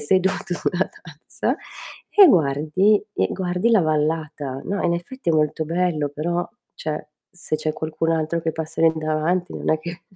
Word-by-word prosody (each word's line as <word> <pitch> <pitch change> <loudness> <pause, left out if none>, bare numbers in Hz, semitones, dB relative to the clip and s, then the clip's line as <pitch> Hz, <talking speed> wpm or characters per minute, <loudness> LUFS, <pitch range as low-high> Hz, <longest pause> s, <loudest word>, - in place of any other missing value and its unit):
seduto 190 +4 +1
sulla 180 +1 0
tazza 155 -2 -4 0.5
e 405 -2 +8
guardi 160 - +3
e - - +1
guardi 180 +4 0
la 220 - +5
vallata. 155 -3 -1
No, 200 0 -2
in 170 - +2
effetti, 175 +4 -3
è - - +2
molto 155 0 +1
bello, 165 -2 0
però 170 +4 -2 0.3
cioè, 150 -1 -4 0.2
se 175 -3 -3
c'è 155 0 -2
qualcun 155 +1 -2
altro 165 +1 0
che 160 0 -1
passa 160 0 -5
lì 165 -1 +6
davanti 155 +3 -1
non - - -1
è 155 - +2
che 170 +3 -8
165 Hz, 165 wpm, -22 LUFS, 155-180 Hz, 0.5 s, e